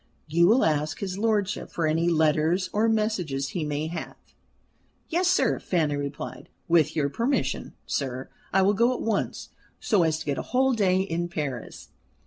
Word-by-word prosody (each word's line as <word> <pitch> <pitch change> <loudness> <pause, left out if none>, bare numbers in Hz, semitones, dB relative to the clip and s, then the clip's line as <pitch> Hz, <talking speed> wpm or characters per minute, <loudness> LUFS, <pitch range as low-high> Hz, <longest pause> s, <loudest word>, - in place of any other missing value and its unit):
You 170 +3 +3
will 230 +6 +5
ask 150 -1 0
his 190 -1 -4
lordship 210 -2 0
for 165 - -2
any 165 +2 +2
letters 160 +3 +2
or 220 +2 +2
messages 180 -12 0
he 165 +2 -3
may 150 0 -2
have." 165 +2 -5 0.9
"Yes, 350 +2 +1
sir," 360 +1 +2
Fanny 155 -5 0
replied. 140 0 -6 0.2
"With 165 -3 +3
your 150 -3 +1
permission, 235 - -1
sir, 130 -2 -3 0.2
I 190 0 +4
will 200 +2 +4
go 235 +4 +3
at - - -5
once, 220 -3 -2 0.3
so 205 -4 +2
as 160 -2 +2
to 160 - -7
get 140 -2 -1
a - - -8
whole 265 0 +4
day 190 -4 +2
in 175 -2 -2
Paris." 145 -8 -5
170 Hz, 170 wpm, -26 LUFS, 155-210 Hz, 0.9 s, will